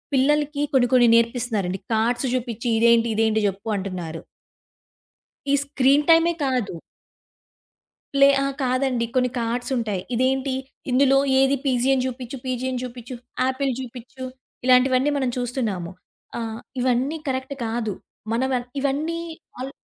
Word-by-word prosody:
పిల్లలకి 290 +2 +2
కొన్ని, 250 -2 +4
కొన్ని 245 -2 +6
నేర్పిస్తున్నారండి, 230 -5 0 0.2
కార్డ్స్ 240 +4 +1
జూపిచ్చి 240 -1 -3
ఇదేంటి, 235 0 +5
ఇదేంటి 220 0 +2
జెప్పు 200 +3 -4
అంటున్నారు. 180 -4 -5 1.3
ఈ - - +3
స్క్రీన్ 280 +1 +3
టైమే 330 +1 +6
కాదు. 250 -7 -1 1.4
ప్లే 275 0 +7
అహా! 275 0 0
కాదండి, 255 -1 +1
కొన్ని 250 0 +3
కార్డ్స్ 240 +2 -2
ఉంటాయి. 210 -5 -2
ఇదేంటి, 260 +2 +1 0.4
ఇందులో 270 +1 +4 0.2
ఏది 270 +1 +4
పీజియన్ 265 0 +2
అని 255 - 0
జూపిచ్చు, 255 +1 -5
పీజియన్ 255 0 -2
అని 245 - -3
జూపిచ్చు, 245 0 -7 0.3
ఆపిల్ 265 +1 0
జూపిచ్చు, 255 +1 -9 0.4
ఇలాంటివన్నీ 255 +2 +4
మనం 260 -2 0
చూస్తున్నాము. 230 -8 -2 0.5
ఆహ్, 225 -1 -4 0.2
ఇవన్నీ 260 +5 +1
కరెక్ట్ 260 +1 -2
కాదు. 225 -2 -2 0.4
మనం 255 +3 +1
వ - - +3 0.2
ఇవన్నీ 295 +5 -1 0.4
అల్ 260 +2 -5
255 Hz, 125 wpm, -23 LUFS, 230-270 Hz, 1.4 s, ప్లే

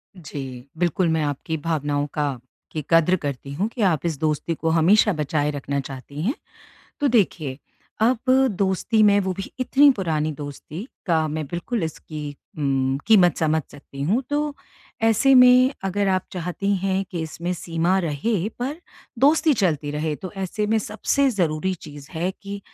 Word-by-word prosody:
जी, 135 -7 -8
बिल्कुल 175 +1 +1
मैं 160 -1 +1
आपकी 145 +2 -2
भावनाओं 145 -2 -1
का 145 -3 -1 0.3
की 155 - -4
कद्र 165 +2 +5
करती 140 -4 -5
हूँ 185 +9 0
कि 245 - -4
आप 175 -7 +2
इस 165 -4 -1
दोस्ती 155 +1 -1
को 160 - -1
हमेशा 185 +6 +4
बचाए 150 -1 0
रखना 140 -1 -3
चाहती 135 +2 -7
हैं। 220 - +1 0.7
तो 290 - +3
देखिए, 170 - +1 0.4
अब 235 +3 +3 0.4
दोस्ती 195 +3 +1
में 205 -1 +6
वो 190 -1 -1
भी 195 - -6
इतनी 280 +3 +5
पुरानी 160 - -1
दोस्ती 150 - -8 0.2
का 160 -3 +2
मैं 155 +1 -3
बिल्कुल 175 - -3
इसकी 150 -2 -6 0.2
उम, 135 -2 +1
कीमत 185 -7 +5
समझ 160 0 +1
सकती 140 -1 -9
हूँ। 205 - +1
तो 295 0 0 0.5
ऐसे 225 +5 +4
में 250 +1 +7
अगर 195 +1 0
आप 185 -1 +2
चाहती 180 +3 -1
हैं 190 +1 0
कि 175 - -3
इसमें 170 +3 -4
सीमा 170 +2 0
रहे 175 +4 -1
पर 260 +4 -2 0.4
दोस्ती 300 +4 +4
चलती 155 - 0
रहे। 150 +1 -2
तो 185 - -7
ऐसे 195 +3 -2
में 220 +1 +2
सबसे 220 +6 +1
ज़रूरी 180 -3 0
चीज़ 145 -4 -11
है 170 +3 -1
कि 200 0 -6
170 Hz, 165 wpm, -23 LUFS, 150-205 Hz, 0.7 s, में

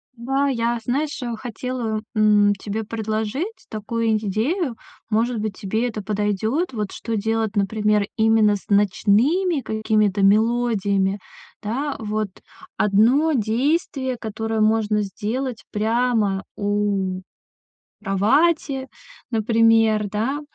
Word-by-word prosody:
Да, 270 +4 0
я, 235 -2 0
знаешь, 290 +5 -2
э, 240 -2 -3
хотела, 235 -1 -4
м, 210 -1 +4
тебе 210 +3 -4
предложить 220 - -3
такую 220 +1 -1
идею, 235 - -1 0.4
может 230 +2 +1
быть 210 -2 -3
тебе 220 +5 -1
это 215 -2 -5
подойдет. 210 - -1
Вот 210 -3 -3
что 230 - -4
делать, 220 0 -1
например, 210 +1 +1
именно 220 -2 +4
с 195 - -9
ночными 230 - +2
какими-то 215 -3 +1
мелодиями, 205 -2 +2 0.4
да. 265 +7 -2
Вот 215 -1 -2 0.5
1 240 +10 +3
действие, 260 +2 0
которое 220 0 -3
можно 215 -1 +2
сделать 230 +5 -4
прямо 220 -3 +1
у 200 -2 -1 0.8
кровати, 265 - +1 0.4
например, 225 -1 +3
да, 240 +8 -1
220 Hz, 105 wpm, -22 LUFS, 210-245 Hz, 0.8 s, м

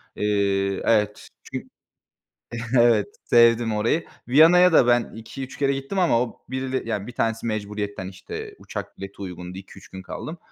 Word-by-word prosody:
iii 100 -2 0
Evet 105 -2 +1 0.2
çün - - -7 1.1
Evet 115 -4 +4 0.2
sevdim 115 -1 +4
orayı. 115 +10 +1 0.2
Viyana'ya 170 +6 +6
da 125 - +6
ben 120 -1 +2
2-3 130 +4 -8
kere 140 -1 +2
gittim 135 +8 -4
ama 165 -10 +3
o 125 - -7
birile 130 0 -2
yani 105 -2 -2
1 125 - -8
tanesi 115 0 -1
mecburiyetten, 105 -3 -4
işte, 95 -1 -8
uçak - - -7
bileti 100 0 -8
uygundu 90 0 -7
2-3 95 0 -13
gün 95 0 -9
kaldım. 160 - -7
115 Hz, 150 wpm, -24 LUFS, 100-130 Hz, 1.1 s, Viyana'ya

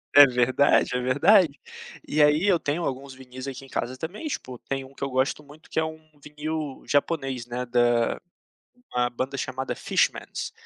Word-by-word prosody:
É 145 0 +11
verdade, 125 +1 +3
é - - +1
verdade. 145 +4 +4 0.5
E 150 +1 +1
aí 150 +4 +4
eu 180 -4 +4
tenho 155 +4 -2
alguns 135 0 -4
vinis 130 0 -10
aqui 135 0 -6
em 135 - -14
casa 125 +2 -3
também, 180 - -6
tipo, 130 - -5
tem 135 +2 -4
um 135 +1 -14
que 140 - -8
eu 140 - -1
gosto 130 +3 0
muito 150 +3 -17
que - - 0
é - - +2
um 160 0 -7 0.2
vinil 150 -1 -5
japonês, 135 -4 0
né, 120 +1 -4
da 120 -1 +2 0.7
uma 125 0 +1
banda 130 +3 -4
chamada 130 0 -3
Fishmans, - - -1
135 Hz, 180 wpm, -25 LUFS, 130-150 Hz, 0.7 s, É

